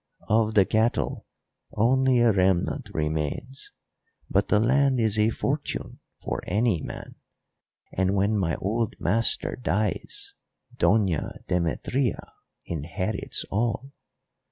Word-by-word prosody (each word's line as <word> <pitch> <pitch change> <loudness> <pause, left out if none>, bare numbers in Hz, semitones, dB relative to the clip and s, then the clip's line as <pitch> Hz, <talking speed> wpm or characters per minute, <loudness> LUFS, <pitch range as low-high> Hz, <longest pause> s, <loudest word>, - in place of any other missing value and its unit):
Of 110 0 +2
the 100 -2 +6
cattle 110 +4 0 0.5
only 130 +3 +3
a 120 -1 +5
remnant 95 -2 +1
remains, 80 - -3 0.6
but - - +2
the 105 - +3
land 130 +3 +3
is 110 -2 +2
a 105 +1 +4
fortune 140 +5 -3 0.2
for - - -3
any 105 -3 +1
man, - - -8 0.8
and, 95 +1 +1
when 100 +2 +2
my 85 -6 0
old 110 +3 -1
master 115 +2 +1
dies, 105 -6 -2 0.4
Doña 100 -8 +1
Demetria 90 - -1 0.3
inherits 85 +6 -3
all. 120 +5 -1
110 Hz, 105 wpm, -26 LUFS, 95-120 Hz, 0.8 s, the